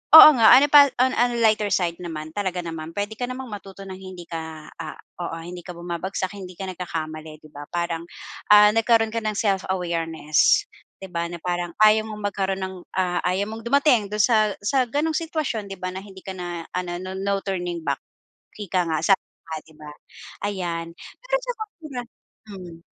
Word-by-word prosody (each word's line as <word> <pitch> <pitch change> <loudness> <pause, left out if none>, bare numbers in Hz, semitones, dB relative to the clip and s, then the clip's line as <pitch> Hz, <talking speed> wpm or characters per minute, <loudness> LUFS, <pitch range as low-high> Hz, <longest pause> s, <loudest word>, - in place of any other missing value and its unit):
oo 315 - +14
nga 225 -2 +6
ano 275 +3 +6
pa 285 -1 +9
on 260 0 +4
on 245 0 +3
lighter 215 -1 +3
side 170 -2 0
naman, 155 -3 -6
talaga 185 -3 -1
naman 165 -1 -6
puwede 205 +1 -2
ka 245 - -1
namang 255 -1 -6
matuto 195 -1 -9
ng 190 -1 -7
hindi 185 -2 -9
ka, 160 -2 -7
ah, 160 -2 -6 0.3
oo, 165 -1 -4
hindi 175 +1 -7
ka 180 - -8
bumabagsak 175 +2 -3
hindi 185 -2 -9
ka 190 -1 -4
nagkakamali, 155 -3 -6
'di 155 - -14
ba? 145 0 -9
Parang, 170 -1 -2 0.5
ah, 210 0 +9
nagkaroon 225 0 +3
ka 230 - 0
ng 215 -1 -1
self-awareness 170 -6 +1 0.3
'di 190 - -8
ba, 170 0 0
na 175 - -6
parang 175 0 -2
ayaw 215 0 +6
mong 210 -1 -6
magkaroon 195 -1 -1
ng, 190 0 -4 0.2
ah, 180 -1 +1
ayaw 190 +3 0
mong 225 +1 -7
dumating 265 -5 +4
dun 210 - -3
sa 215 -3 +4
sa 260 +5 +2
ganong 305 +5 0
sitwasyon, 310 -10 -2
'di 195 - -6
ba, 185 0 -3
na 190 - -5
hindi 195 -2 -12
ka 190 - -6
na 175 -2 -5
ano 175 -1 -3
no 185 +1 -6
no 195 +1 0
turning 175 -3 -3
back - - 0 0.6
ika 185 -3 0
nga 160 -1 0
sabi 195 -2 +4 0.2
nga 160 - -5
'di 160 - -19
ba? 150 -1 -9 0.6
Ayan 175 -4 -3 0.3
pero - - -1
sa - - -2
kultura 325 - -7 0.5
mm. 175 -4 -10
190 Hz, 190 wpm, -24 LUFS, 170-215 Hz, 0.6 s, oo